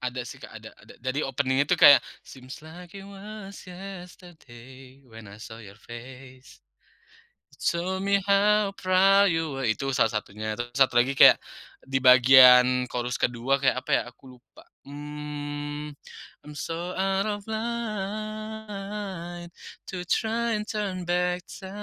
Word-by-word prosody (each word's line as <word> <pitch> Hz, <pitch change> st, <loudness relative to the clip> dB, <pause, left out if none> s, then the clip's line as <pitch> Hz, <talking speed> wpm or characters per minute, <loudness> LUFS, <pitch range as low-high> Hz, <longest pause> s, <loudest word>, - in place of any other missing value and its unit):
Ada 125 Hz, 0 st, -4 dB
sih -, -, -9 dB
Kak, -, -, -13 dB
ada -, -, -11 dB
ada, -, -, -17 dB
jadi 130 Hz, +4 st, -2 dB
opening 135 Hz, +1 st, 0 dB
itu -, -, -2 dB
kayak, 145 Hz, -, +8 dB, 0.2 s
seem's 130 Hz, +1 st, -12 dB
like 170 Hz, +3 st, -13 dB
you 195 Hz, 0 st, -10 dB
was 200 Hz, 0 st, -10 dB
yesterday, 170 Hz, -9 st, -12 dB
when 115 Hz, -1 st, -12 dB
i 100 Hz, +1 st, -13 dB
saw 110 Hz, 0 st, -10 dB
your 100 Hz, -3 st, -13 dB
face, 130 Hz, +3 st, -13 dB, 0.9 s
it -, -, -22 dB
so 180 Hz, +2 st, -1 dB
me 200 Hz, +1 st, +2 dB
how 205 Hz, 0 st, +3 dB
proud 195 Hz, +1 st, +4 dB
you 160 Hz, -5 st, -2 dB
wah -, -, -3 dB
itu 135 Hz, +5 st, -1 dB
salah 115 Hz, -, +3 dB
satunya, 105 Hz, 0 st, -5 dB
terus 120 Hz, 0 st, -6 dB
satu 130 Hz, 0 st, +2 dB
lagi 125 Hz, +3 st, +3 dB
kayak 135 Hz, -, +8 dB, 0.5 s
di 135 Hz, 0 st, -1 dB
bagian 125 Hz, -1 st, +7 dB
chorus 125 Hz, 0 st, -4 dB
ke-2 125 Hz, +3 st, 0 dB
kayak 135 Hz, -, +2 dB
apa -, -, -9 dB
ya -, -, -13 dB
aku 125 Hz, 0 st, -16 dB
lupa. 310 Hz, -, -20 dB, 0.2 s
Mmm. 145 Hz, 0 st, -6 dB, 0.5 s
I'm 150 Hz, -, -10 dB
so 170 Hz, +3 st, -5 dB
out 195 Hz, +1 st, 0 dB
of 205 Hz, -1 st, -4 dB
light 210 Hz, -5 st, -5 dB, 0.4 s
to 185 Hz, -, -5 dB
try 230 Hz, +2 st, 0 dB
turn 200 Hz, -4 st, -4 dB
back 180 Hz, +1 st, -1 dB, 0.2 s
to 190 Hz, -, -9 dB
155 Hz, 145 wpm, -26 LUFS, 130-195 Hz, 0.9 s, kayak